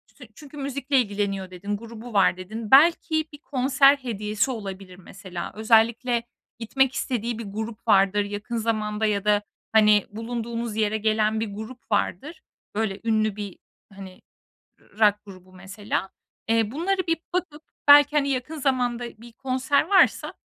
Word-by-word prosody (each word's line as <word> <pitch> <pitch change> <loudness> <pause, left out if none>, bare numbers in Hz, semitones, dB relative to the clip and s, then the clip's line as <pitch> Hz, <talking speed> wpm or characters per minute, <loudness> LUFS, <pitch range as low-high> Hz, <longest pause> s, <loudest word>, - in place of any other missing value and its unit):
tün - - -14
çünkü 295 -1 -13
müzikle 280 0 -1
ilgileniyor, 200 -4 -2
dedin; 200 +3 -4
grubu 230 +1 -10
var, 195 -2 +3
dedin. 215 +4 -7
Belki 315 +2 +5
bir 290 - -9
konser 275 -1 +3
hediyesi 220 -1 -2
olabilir 195 -5 -7
mesela. 185 -1 -8
Özellikle 230 +2 +2 0.4
gitmek 265 +3 +1
istediği 235 -3 -3
bir 230 - -6
grup 220 +3 -7
vardır 200 0 +4
yakın 205 +4 -5
zamanda 215 -1 -1
ya 205 -1 0
da, 210 -1 +3 0.3
hani, 210 -2 +5
bulunduğunuz 230 0 -4
yere 215 0 0
gelen 215 0 +1
bir 220 -2 -4
grup 225 +3 -10
vardır. 280 - -2 0.3
Böyle 205 -2 -2
ünlü 215 -2 +1
bir, 205 -2 -7 0.4
hani, 190 -1 -11 0.6
rock 210 -1 +2
grubu 185 -2 -14
mesela. 190 +1 -4 0.4
Eee, 225 -2 +2
bunları 370 +6 -1
bir 330 0 +1 0.2
bakıp 320 -4 -3 0.2
belki, 290 +1 +7
hani, 280 -1 +1
yakın 270 +4 -3
zamanda 245 -3 0 0.2
bir 235 0 -13
konser 260 +2 0
varsa 385 +4 +3
225 Hz, 145 wpm, -24 LUFS, 205-260 Hz, 0.6 s, belki